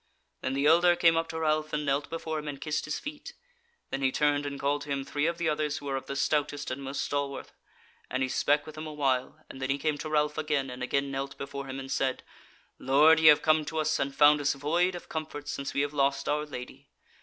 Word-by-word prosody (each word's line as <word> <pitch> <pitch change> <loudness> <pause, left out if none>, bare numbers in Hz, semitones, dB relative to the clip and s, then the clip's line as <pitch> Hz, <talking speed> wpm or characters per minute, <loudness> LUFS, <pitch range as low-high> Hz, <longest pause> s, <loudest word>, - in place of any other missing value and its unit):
Then 130 - -2
the 140 +1 0
elder 175 +3 +6
came 170 -1 +4
up 165 0 0
to 160 - -4
Ralph 155 -1 0
and 150 0 -1
knelt 140 +1 0
before 160 -1 -3
him 150 - -8
and 140 -2 -5
kissed 150 -1 -2
his 155 - -3
feet; 295 0 -8 0.6
then 135 - -2
he 135 -1 +2
turned 145 0 +1
and 140 -1 -5
called 145 +1 0
to 145 - -9
him 140 -1 -2
three 145 +2 -1
of 170 0 -1
the 170 -1 -1
others 150 -1 0
who 145 - -9
were 135 -1 -2
of 135 - -5
the 140 - -4
stoutest 145 0 0
and 130 +2 -4
most 135 +1 -3
stalwarth, 140 -1 -3 0.6
and 130 0 -1
he - - +1
spake 145 +3 +2
with 155 - -9
them 155 +1 -7
awhile, 145 0 -1
and 130 - -10
then 130 - -2
he 135 - +1
came 150 0 -1
to 155 - -5
Ralph 150 0 +1
again, 145 -4 -1
and 125 0 -8
again 140 +2 -1
knelt 135 +1 -4
before 140 0 -6
him 135 0 -5
and 135 0 -7
said: 130 -1 -1 0.6
"Lord, 150 +4 +5
ye 160 - +5
have 150 -1 +7
come 155 0 +4
to 160 +1 -5
us, 155 0 +1
and 140 0 -2
found 150 0 +6
us 140 - +2
void 170 +6 +1
of 175 - -9
comfort, 155 -2 -5
since 140 - -4
we 140 - +2
have 145 +1 -2
lost 140 -1 +1
our 150 +1 0
Lady. 125 -3 -9
145 Hz, 250 wpm, -29 LUFS, 140-155 Hz, 0.6 s, have